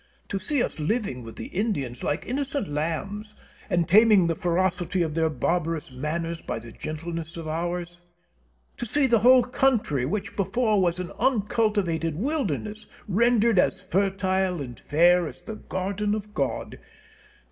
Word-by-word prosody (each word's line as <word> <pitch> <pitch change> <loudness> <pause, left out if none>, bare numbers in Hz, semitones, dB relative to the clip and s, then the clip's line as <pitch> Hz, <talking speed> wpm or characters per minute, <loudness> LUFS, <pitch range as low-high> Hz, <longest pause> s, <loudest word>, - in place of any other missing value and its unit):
To 195 - -2
see 255 +6 0
us - - -4
living 155 - -1
with 115 -1 -10
the - - -6
Indians 145 - -2
like 145 - -1
innocent 275 -2 -2
lambs, 195 +8 -3 0.3
and 170 -2 +1
taming 210 0 +6
the 165 - +1
ferocity 180 +1 0
of 160 -2 -2
their 160 0 +2
barbarous 165 -2 -1
manners 165 +5 -3
by - - -4
the 115 0 -9
gentleness 165 +4 -6
of 165 -1 -6
ours! 175 +2 -3 0.8
To 240 - -4
see 285 +5 +2
the 235 -3 +4
whole 250 +3 +7
country, 235 - +1
which 205 +6 -3
before 210 +1 +1
was 175 -1 +1
an 180 -2 -4
uncultivated 210 - +1
wilderness, 215 - -2 0.2
rendered 230 0 +3
as - - +2
fertile 190 -1 0
and 125 -5 -7
fair 175 +3 +4
as - - -9
the 220 - -7
garden 200 +3 -2
of 210 0 -7
God! 140 -6 -2
185 Hz, 150 wpm, -26 LUFS, 165-215 Hz, 0.8 s, whole